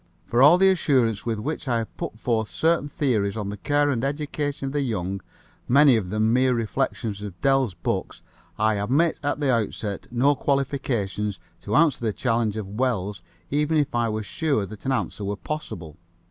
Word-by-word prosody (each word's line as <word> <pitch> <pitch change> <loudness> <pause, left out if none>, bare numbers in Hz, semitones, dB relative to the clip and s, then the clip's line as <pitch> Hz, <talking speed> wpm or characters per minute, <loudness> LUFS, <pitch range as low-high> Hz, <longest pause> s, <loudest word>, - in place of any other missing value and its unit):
For 120 +7 +1
all 150 +6 +8
the 190 +1 +5
assurance 125 - +1
with 115 -1 0
which 145 +6 -4
I 120 -2 +2
have 115 -1 -5
put - - -5
forth 110 -2 -1
certain 160 -2 +1
theories 115 -8 0
on 105 -2 -3
the 105 - -5
care 145 +6 +1
and 120 -2 -1
education 145 0 -2
of 135 - -4
the 145 - +1
young, 100 -6 -2 0.5
many 140 0 +6
of 100 -5 -1
them 110 +2 +1
mere 130 0 +3
reflections 115 -2 -2
of 100 -4 -7
Dell's 135 -8 +2
book, - - -2 0.4
I 110 0 +2
admit 140 +11 +1
at 145 0 -1
the 140 -3 +2
outset 105 -3 -2
no 125 +4 +3
qualification 130 -8 -1 0.3
to 105 - -2
answer 150 -5 +3
the 110 -2 0
challenge 115 -3 0
of 105 +1 -6
Wells 105 -7 -1 0.3
even 150 +2 +1
if 145 -1 +1
I 120 -1 +1
were 110 0 -2
sure 140 - -1
that 105 +5 -9
an - - +2
answer 125 -5 -2
were 100 +1 -2
possible. 90 - -6
120 Hz, 190 wpm, -24 LUFS, 105-140 Hz, 0.5 s, all